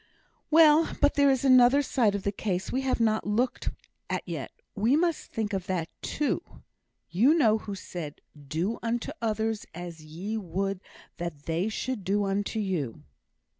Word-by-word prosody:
"Well, 315 0 +5
but 290 - +4
there 285 -1 +4
is 265 0 +2
another 255 +2 +6
side 230 -7 +2
of 200 - -3
the 200 - 0
case 190 -3 -2
we 260 - 0
have 265 -2 0
not 220 -2 +1
looked 235 +5 0 0.4
at - - -1
yet - - -5 0.2
we 225 +6 +2
must 335 0 0
think 220 -2 -2
of 190 -2 -2
that, 175 -3 -1
too. 295 - -1 0.7
You 245 - +5
know 220 -9 +4
who 205 -2 -6
said, 170 -5 -7 0.3
'Do 175 +10 -1
unto 235 +3 -2
others 220 -1 -1
as 175 -2 -7
ye 180 +8 -5
would 195 0 -2 0.4
that 170 -4 -5
they 170 +6 0
should 230 0 -3
do 205 +2 +1
unto 200 +3 -1
you'? 180 - -2
210 Hz, 165 wpm, -28 LUFS, 185-250 Hz, 0.7 s, another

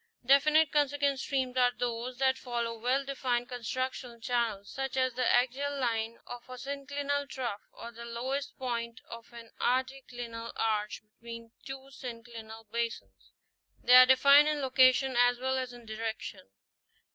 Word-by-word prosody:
Definite 300 +3 +5
consequent 285 -1 +1
streams 260 -2 -1
are 245 -1 +4
those 245 +1 -3
that 265 0 +2
follow 235 -2 -3
well 255 +5 0
defined 250 -3 -1
constructional 250 0 -4
channels, 230 -4 -1
such 270 0 -4
as 255 -1 +2
the 250 +1 0
axial 270 +3 +1
line 230 -2 -1
of 245 +1 -9
a 255 - -8
syn 275 +2 -6
clinal 285 0 -2
trough, 240 -6 -4
or 235 - -9
the 235 0 -10
lowest 260 +4 -4
point 235 -2 -3
of 230 +1 -10
an 235 -1 -12
anticlinal 245 -3 -2
arch 215 -1 -1
between 230 +1 -11 0.2
two 270 0 -8
synclinal 230 -3 -9
basins; 235 0 -4 0.5
they 250 - +5
are 255 0 +10
defined 280 +3 +7
in 300 -1 0
location 260 -1 +4
as 245 0 +4
well 260 +1 -1
as 255 -1 -2
in 240 -1 -13
direction. 220 - -5
250 Hz, 150 wpm, -30 LUFS, 235-270 Hz, 0.5 s, are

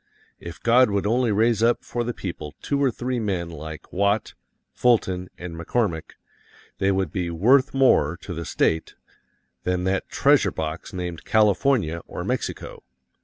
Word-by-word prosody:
If 85 -1 -9
God 125 +1 +5
would 100 -1 -1
only 120 +2 +2
raise 110 +1 +2
up 120 +1 +2
for 120 - -2
the 120 - -2
people 80 -9 -7
two 140 0 0
or 135 - +4
three 125 +1 -3
men 90 -6 -2
like 80 -1 -9
Watt, 100 +3 +1 0.4
Fulton 95 -7 +1
and 90 -1 -7
McCormick, 85 0 -2 0.7
they 95 0 +2
would 95 -5 0
be 90 -2 -2
worth 130 - +3
more 90 - +3
to 90 - -6
the 85 0 -5
State 80 0 0 0.7
than 90 0 -1
that 95 +1 -1
treasure - - +3
box 80 +1 -5
named 90 -3 -5
California 105 - +2
or - - -6
Mexico. - - -4
95 Hz, 155 wpm, -24 LUFS, 85-120 Hz, 0.7 s, God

